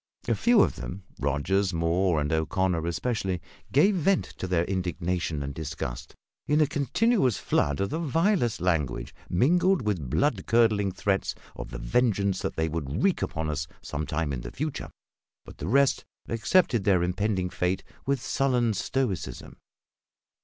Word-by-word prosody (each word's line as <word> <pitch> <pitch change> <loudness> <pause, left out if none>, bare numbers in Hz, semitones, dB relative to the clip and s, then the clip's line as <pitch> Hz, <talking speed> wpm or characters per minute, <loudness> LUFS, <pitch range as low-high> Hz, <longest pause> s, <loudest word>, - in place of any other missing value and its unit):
A - - +3
few 240 -3 +4
of - - -1
them 95 +1 -6 0.2
Rogers, 85 +7 0
Moore, 85 +1 +2
and 75 +1 -1
O'Connor 85 +1 0
especially 95 +1 -1 0.3
gave 175 +10 +5
vent 185 +2 +2
to 95 - -3
their 85 -2 +1
indignation 90 -4 -2
and 70 0 -4
disgust 70 -5 -5 0.3
in 150 +1 +3
a 155 - +6
continuous 145 - +1
flood 70 0 0
of 100 - -1
the 160 - -1
vilest 165 - +1
language, 75 -9 0 0.2
mingled 175 - +3
with 90 - -2
blood 115 - +1
curdling 110 -4 +3
threats 95 +1 -1 0.2
of - - -7
the - - -6
vengeance 100 - +1
that - - -3
they 80 0 0
would 80 -1 -3
wreak 195 -2 +2
upon 80 0 -2
us 75 -1 -2 0.2
some 70 0 -4
time 75 -1 -1
in 60 - -3
the - - -6
future; 150 - -4 0.6
but - - -13
the - - -4
rest 140 +5 +3 0.2
accepted 115 - +2
their 95 -3 +3
impending 90 0 -1
fate 90 +1 -1 0.2
with 140 -1 +1
sullen 125 -3 +1
stoicism. 105 -2 -3
95 Hz, 155 wpm, -27 LUFS, 80-130 Hz, 0.6 s, a